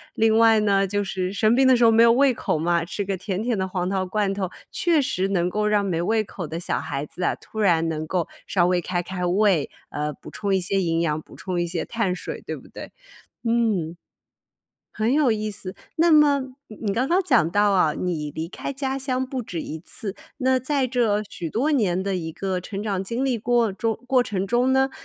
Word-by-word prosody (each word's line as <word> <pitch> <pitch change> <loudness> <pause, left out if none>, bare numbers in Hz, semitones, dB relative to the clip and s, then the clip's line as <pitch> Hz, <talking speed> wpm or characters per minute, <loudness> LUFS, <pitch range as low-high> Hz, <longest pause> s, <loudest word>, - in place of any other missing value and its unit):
另 220 0 +3
外 225 -1 +6
呢 195 -1 +2
就 205 +1 -1
是 190 -1 -3
生 215 +3 +3
病 265 +1 +4
的 260 - +6
时 240 - +2
候 225 - +7
没 225 +1 +5
有 230 0 +7
胃 265 +1 +4
口 165 - -1
嘛， 170 +1 +1
吃 200 +3 -3
个 195 -1 -2
甜 195 +2 -3
甜 240 -2 0
的 190 0 -1
黄 180 -1 -2
桃 190 -1 0
罐 195 +1 0
头， 190 -2 -2 0.2
确 335 -5 +2
实 190 -7 -1
能 180 -2 +1
够 210 +2 0
让 210 -1 +2
没 170 -3 -1
胃 220 +4 +1
口 180 -4 -7
的 165 +2 -5
小 125 - -2
孩 140 +1 -4
子 180 - -10
啊， - - +1
突 220 - -10
然 165 -5 +3
能 155 0 -3
够 175 0 -1 0.2
稍 175 -3 +2
微 180 0 +2
开 175 0 -2
开 180 0 -4
胃， 185 -3 +2 0.2
呃， 150 +1 -3
补 - - -12
充 200 -2 -1
一 - - +2
些 195 +2 0
营 165 -1 0
养， 155 -1 0
补 - - -16
充 180 -2 -3
一 175 - -1
些 170 -1 -3
碳 215 -6 -1
水， - - -6
对 - - -5
不 - - -15
对？ - - -10 0.5
嗯， 220 -8 +1 1.0
很 220 +3 0
有 290 -4 +3
意 215 0 -2
思。 200 -2 -6 0.2
那 335 +1 +4
么 295 -3 +5 0.3
你 215 -2 -4
刚 250 +3 +1
刚 360 +3 +3
讲 245 - +3
到 205 +2 +3
啊， 170 -6 +3
你 160 -5 -2
离 160 +3 -5
开 275 - -5
家 270 -1 -2
乡 260 -1 -1
不 260 -2 -4
止 175 -6 -5
一 155 - -6
次， 195 +4 -6 0.2
那 260 -1 +2
在 265 +1 0
这 230 -4 +1
许 165 -5 -6
多 270 +8 0
年 190 - +1
的 195 -1 -1
一 160 -2 -4
个 190 0 -2
成 200 +1 -5
长 195 -3 -2
经 235 +6 -2
历 260 -3 +1
过 235 -1 +2
中 225 +2 -2
过 255 -1 +4
程 195 -4 -2
中 245 +5 +2
呢， 265 0 +3
200 Hz, 245 characters per minute, -24 LUFS, 180-235 Hz, 1.0 s, 候